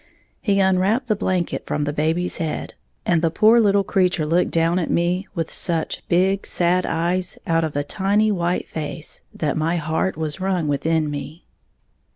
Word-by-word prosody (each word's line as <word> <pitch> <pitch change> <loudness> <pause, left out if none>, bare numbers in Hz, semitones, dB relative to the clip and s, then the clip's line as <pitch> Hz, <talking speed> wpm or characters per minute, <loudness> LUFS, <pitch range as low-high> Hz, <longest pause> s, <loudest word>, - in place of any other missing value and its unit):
He 200 -2 +1
unwrapped 190 +6 +2
the 215 - +3
blanket 185 -4 -2
from 150 - -1
the 145 0 -2
baby's 160 +4 0
head, 160 -3 -3 0.3
and 170 -2 +2
the 165 - +2
poor 220 +7 +5
little 200 -2 +3
creature 180 -4 +1
looked 170 +4 +2
down 165 +2 +1
at 170 - -2
me 180 +3 0
with 165 -2 -2
such 165 -3 0
big, 190 +3 +2
sad 180 +1 +1
eyes 175 +2 -1
out 165 0 +1
of 155 -2 -3
a 145 - 0
tiny 205 +6 +1
white 175 -2 -1
face, 155 0 -6
that 150 -3 -2
my 160 +2 0
heart 160 +2 -1
was 155 +1 -3
wrung 185 -4 0
within 155 +1 0
me. 145 +3 -7
175 Hz, 175 wpm, -22 LUFS, 160-190 Hz, 0.3 s, poor